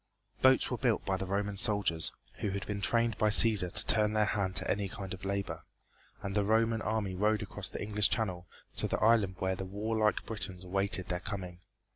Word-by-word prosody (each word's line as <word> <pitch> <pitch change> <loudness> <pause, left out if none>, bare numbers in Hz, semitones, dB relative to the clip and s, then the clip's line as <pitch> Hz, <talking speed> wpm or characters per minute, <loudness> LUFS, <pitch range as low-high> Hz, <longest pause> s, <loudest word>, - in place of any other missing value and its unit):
Boats 130 0 +4
were 125 - -2
built 120 -5 0
by 95 - 0
the 95 0 -5
Roman 100 +1 -2
soldiers, 100 -7 0 0.3
who 105 - -2
had 100 0 -4
been 100 -1 -4
trained 115 +1 0
by 110 - +3
Cæsar 105 -4 +6
to - - +1
turn 105 -1 +2
their 110 0 +2
hand 95 -3 -2
to - - +3
any 100 -1 -1
kind 100 -3 -7
of 95 - -10
labor, 100 0 -3 0.6
and 100 - -4
the 105 0 +1
Roman 110 +2 +1
army 105 -3 -2
rowed 105 +3 0
across - - -4
the - - -6
English 105 0 +2
channel 90 -6 -2 0.3
to - - +4
the - - -1
island 105 -4 +3
where 95 0 -1
the 95 - -6
warlike 105 +3 -1
Britons 95 -4 -2
awaited 95 0 -1
their 90 - -2
coming. 90 -2 -7
100 Hz, 205 wpm, -31 LUFS, 95-110 Hz, 0.6 s, Cæsar